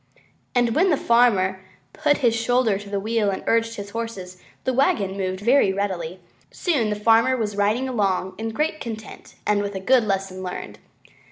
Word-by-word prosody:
And 240 -2 +2
when 365 +8 +3
the 305 - +3
farmer 200 -7 +3 0.3
put 295 -1 +2
his 230 -1 +4
shoulder 230 -3 +1
to 205 0 -10
the 200 0 -1
wheel 220 0 0
and 190 - -3
urged 230 0 +1
on 200 - -5
the 200 - -13
horses, 200 -6 -6 0.3
the 260 - 0
wagon 250 - +1
moved 185 -1 -3
very 235 -2 +4
readily, 190 -4 -2
and 185 - -18 0.3
soon 280 - 0
the 210 - -1
Farmer 230 +4 +3
was 210 -3 -2
riding 210 +6 +1
along 195 -6 0
in 225 0 -2
great 305 +7 -1
content 220 -2 -8
and 210 -1 +2
with 200 -1 -4
a - - -2
good 250 +5 +3
lesson 195 -2 -2
learned. 180 -1 -6
215 Hz, 190 wpm, -23 LUFS, 195-240 Hz, 0.3 s, his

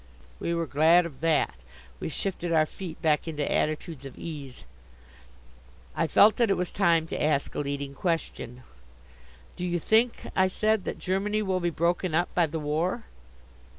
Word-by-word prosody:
We 170 - -1
were 170 0 0
glad 160 +4 +4
of 155 -6 -8
that; 165 -2 +2 0.5
we - - -3
shifted 175 +1 -3
our 160 -1 +4
feet 170 0 -8
back 155 0 +2
into 150 -3 -2
attitudes 155 -1 -1
of 135 -2 -10
ease. 145 -6 -8 1.3
I - - +1
felt 210 +7 +6
that 235 -3 +3
it 195 - +2
was 180 -1 -2
time 170 -4 +3
to - - -3
ask 150 -2 +1
a - - -3
leading 140 -1 -3
question. 140 -6 -3 0.9
"Do 180 - -6
you 175 -1 0
think," 225 +7 +2
I 190 0 +4
said, 215 +2 +1
"that - - -3
Germany 205 +3 -1
will 190 -2 0
be 175 -1 0
broken 170 +1 0
up 175 +2 +1
by 175 -2 +3
the 160 +2 -4
war?" 160 +9 -1
170 Hz, 170 wpm, -27 LUFS, 150-185 Hz, 1.3 s, felt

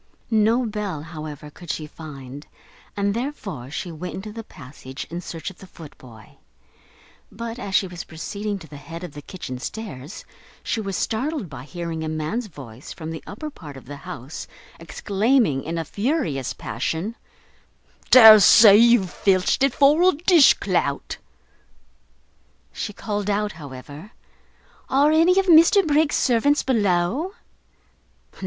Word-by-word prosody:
No 225 +3 +3
bell, 205 -8 -4
however, 155 -2 -8
could 175 +3 -14
she 155 - -3
find, 145 -3 -10 0.5
and 200 0 0
therefore 205 - -5
she 170 +4 -5
went 170 +3 -7
into 210 +3 -7
the 225 0 -7
passage 130 -5 -10
in 170 +1 -4
search 165 +1 -6
of 185 - -20
the 190 - -12
footboy; 130 -10 -14 1.1
but, 230 +3 -6
as 200 -4 -4
she - - +3
was 180 -2 -7
proceeding 200 +6 -5
to 165 -4 -12
the 145 - -11
head 165 +4 -9
of 175 - -7
the 145 - -9
kitchen 140 -6 -8
stairs, 155 - -7 0.4
she 225 - -2
was 195 -2 -4
startled 240 - -2
by 130 -2 -8
hearing 165 +2 -5
a 155 - -3
man's 160 +10 -3
voice 135 - -11
from 160 0 -7
the 160 - -7
upper 305 +9 -7
part 150 - -11
of 135 - -13
the 145 +3 -9
house 135 0 -8 0.3
exclaiming, 200 - 0
in 165 +1 -4
a 165 - -3
furious 205 - -2
passion, 190 +8 -4 0.9
"Dare 220 -4 +10
say 205 +1 +8
you've 230 -4 +5
filched 190 +2 +1
it 275 0 +4
for 290 +4 +5
a - - +2
dish 330 -1 +5
clout!" - - -2 1.6
She 210 - -4
called 205 0 -4
out, 210 +1 0
however, 145 - -11 0.8
"Are 280 +3 +4
any 330 +4 +4
of 390 - +1
Mr 340 +3 +6
Briggs's 300 0 +2
servants 275 +4 +2
below?" 215 - 0
190 Hz, 150 wpm, -23 LUFS, 155-230 Hz, 1.6 s, Dare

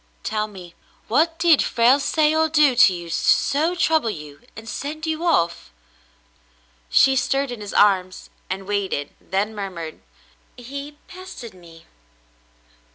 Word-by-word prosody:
Tell 215 0 -2
me, 185 -4 -12 0.3
what 325 +8 +1
did 335 -3 +4
Frale 240 +4 +3
say 300 +2 +1
or 320 0 +2
do 300 -4 +4
to 240 -5 +6
you 175 -1 -6
to - - -2
so 315 +5 +2
trouble 320 -8 +1
you 150 -7 -9
and 225 0 -11
send 305 +7 -5
you 320 +1 -3
off?" 240 - 0 1.2
She 270 - +4
stirred 270 0 0
in 240 -3 -7
his 205 - -7
arms 185 -3 +2 0.2
and 190 +1 -4
waited, 195 -8 -2
then 205 +3 -2
murmured, 180 -6 -7 0.6
"He 280 +4 -8
pestered 370 - -10
me." 170 -2 -16
235 Hz, 140 wpm, -22 LUFS, 190-300 Hz, 1.2 s, to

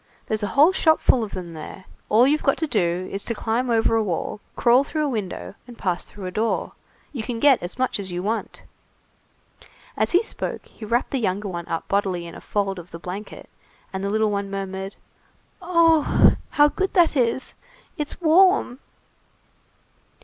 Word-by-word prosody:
There's 215 0 -2
a 205 - -1
whole 305 +6 +7
shopful 315 -8 +3
of 215 - -7
them 180 -3 -6
there. 165 +4 -9 0.2
All 225 +4 +5
you've 300 +3 +2
got 275 - +2
to 320 - -1
do 185 - 0
is 195 - -3
to 230 - -2
climb 235 +4 -1
over 225 -1 +2
a 225 - +3
wall, 190 +1 -3 0.2
crawl 245 +2 +4
through 305 +1 -2
a - - 0
window, 190 - -4
and 240 -1 -12
pass 180 -3 -2
through 200 -2 -10
a 185 - -4
door. 220 +4 -1 0.4
You 255 - -3
can 230 +1 -4
get 275 0 +5
as 175 +5 -5
much 255 -4 0
as 190 -2 -3
you 175 +1 -3
want." 220 +3 -3 1.3
As - - +1
he 360 +5 +5
spoke, - - -3
he 220 - -11
wrapped 235 +3 0
the 270 - 0
younger 200 -1 -1
one 170 -2 -6
up 165 - -3
bodily 190 -3 0
in 170 - -9
a - - -10
fold 195 -2 -2
of 175 0 -12
the 170 - -8
blanket, 185 +5 -8 0.5
and 190 0 -4
the 200 - -1
little 215 0 +1
one 200 -1 -2
murmured:— 195 0 -5 0.7
"Oh! 330 -3 +4 0.2
how 295 0 +5
good 380 +5 -2
that 345 -4 +4
is! 250 0 0 0.4
It's 300 -4 -4
warm!" 345 -5 +4
220 Hz, 185 wpm, -23 LUFS, 190-275 Hz, 1.3 s, whole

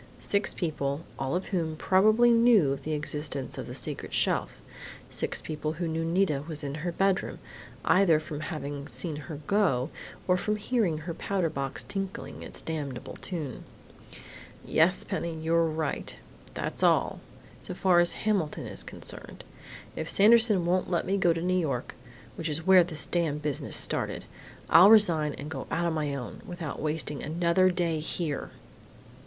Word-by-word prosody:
Six 200 0 0
people, 145 -4 -2 0.2
all 135 +4 -1
of 185 - -3
whom 165 -5 -1
probably 215 +8 +4
knew 230 - +5
of 140 - -3
the 155 - -3
existence 150 -2 -3
of - - -6
the - - -7
secret - - -3
shelf.... - - 0 0.5
Six - - -1
people 155 0 -4
who 170 +1 -3
knew 160 0 -2
Nita 165 -4 +1
was 155 -2 -5
in 140 -1 -3
her 175 +1 -2
bedroom, 195 +2 0 0.5
either 180 -5 +5
from 155 -1 -7
having 145 -3 -5
seen 165 -4 -3
her 150 0 -8
go 170 -10 +1 0.4
or 180 0 +4
from 210 +3 -1
hearing 210 -6 0
her 165 +2 -5
powder 180 -2 -1
box 135 -1 -3
tinkling 195 -1 -5
its - - -6
damnable 145 -6 -5
tune!... 155 -9 -6 1.0
Yes, 175 +4 +3
Penny! 170 -1 -3
You're 165 +1 +2
right! 155 -1 -3 0.4
That's - - -4
all - - +3 0.4
so - - -6
far 185 -2 +4
as 175 0 +3
Hamilton 195 -8 -1
is - - -6
concerned! - - -6 0.5
If 160 - -4
Sanderson 215 -3 +5
won't 180 +1 +1
let 175 -2 0
me 195 - 0
go 185 -3 +3
to 165 0 -2
New 185 +1 +2
York 135 -7 -2 0.4
which 165 -1 -3
is 155 +2 -2
where 190 -1 +7
this 165 -3 0
damned 155 -4 -1
business 150 -2 -1
started - - +1 0.4
I'll 180 +4 +8
resign 170 -9 +5
and 145 - -7
go 145 -4 -6
on 170 0 0
my 150 -3 -1
own, 125 -4 -7
without 175 -7 -6
wasting 150 -2 -2
another 170 +4 +2
day 170 -3 0
here!" 155 -2 -3
165 Hz, 160 wpm, -28 LUFS, 150-185 Hz, 1.0 s, I'll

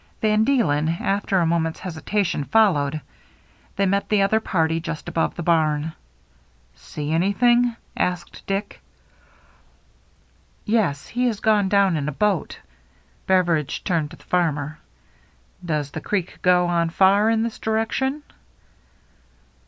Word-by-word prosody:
Van 215 0 +2
Deelen, 180 - +2
after 195 0 0
a 175 - +3
moment's 165 -1 -1
hesitation, 180 -1 -2
followed. 155 -7 +2 0.7
They 200 - +1
met 200 +1 0
the 210 -2 +3
other 220 +3 +2
party 165 -6 0
just 165 -1 -6
above 165 - -1
the 175 - -5
barn. 155 -2 +1 0.4
" 60 0 -36
See 150 0 -6
anything? 235 +8 +2
" - - -36
asked 180 -1 -3
Dick. 195 +1 -3 1.8
"Yes. 205 -11 0
He 250 +1 0
has 220 -4 -2
gone 210 -3 +2
down 200 -4 +3
in 145 0 -2
a - - -3
boat." 200 +4 -1 0.7
Beveridge 170 -6 +1
turned 165 -6 0
to 165 - -13
the - - -20
farmer. 155 -4 -1 0.4
" - - -33
Does 150 -4 -2
the 160 - -6
creek 185 -1 -3
go 180 -1 +4
on 170 -1 +1
far 195 +5 +4
iri 225 0 +2
this 230 -1 -4
direction 265 +6 -1
180 Hz, 135 wpm, -22 LUFS, 160-210 Hz, 1.8 s, go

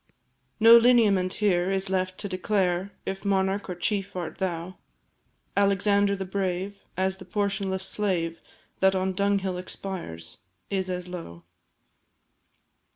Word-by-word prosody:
No 230 +1 +9
lineament 210 -6 +4
here 185 -4 +2
is 195 0 0
left 185 0 -1
to 205 - -4
declare 185 -1 0
If 195 0 -4
monarch 195 0 0
or 180 - -3
chief 195 +2 -2
art 175 -3 -5
thou; 180 -1 -3 0.8
Alexander 200 0 +3
the 190 -1 -4
Brave, 190 +1 -3 0.2
as 190 0 +1
the 190 - -11
portionless 195 -1 -1
slave 180 -5 -1 0.4
That 190 0 +4
on 190 0 0
dunghill 195 -1 0
expires, 170 - -6 0.3
is 190 -1 -1
as 180 0 -3
low. 165 - -8
190 Hz, 125 wpm, -26 LUFS, 180-200 Hz, 0.8 s, No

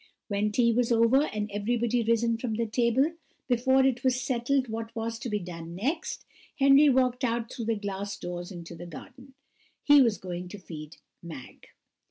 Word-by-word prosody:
When 205 +1 0
tea 235 +1 +3
was 245 +1 +1
over, 235 +5 +4
and 210 -1 -3
everybody 235 +3 0
risen 230 0 +2
from 230 -3 -2
the 230 +1 0
table, 240 +6 +2 0.4
before 260 +2 +3
it 255 -2 +1
was 255 -1 +2
settled 255 +1 0
what 225 +1 -6
was 225 0 -3
to 245 - -5
be 210 - 0
done 170 -3 -7
next, 290 - -3 0.3
Henry 275 +1 +6
walked 255 -1 +2
out 235 -1 -1
through 230 - -5
the 225 0 +1
glass 200 -1 -4
doors 175 +1 -6
into 170 -2 -8
the 170 +1 -9
garden 255 - -12 0.5
he 290 -1 +7
was 230 -5 +3
going 180 -1 -6
to 205 - -9
feed 155 -5 -10 0.2
Mag. 155 -7 -11
230 Hz, 180 wpm, -28 LUFS, 200-255 Hz, 0.5 s, he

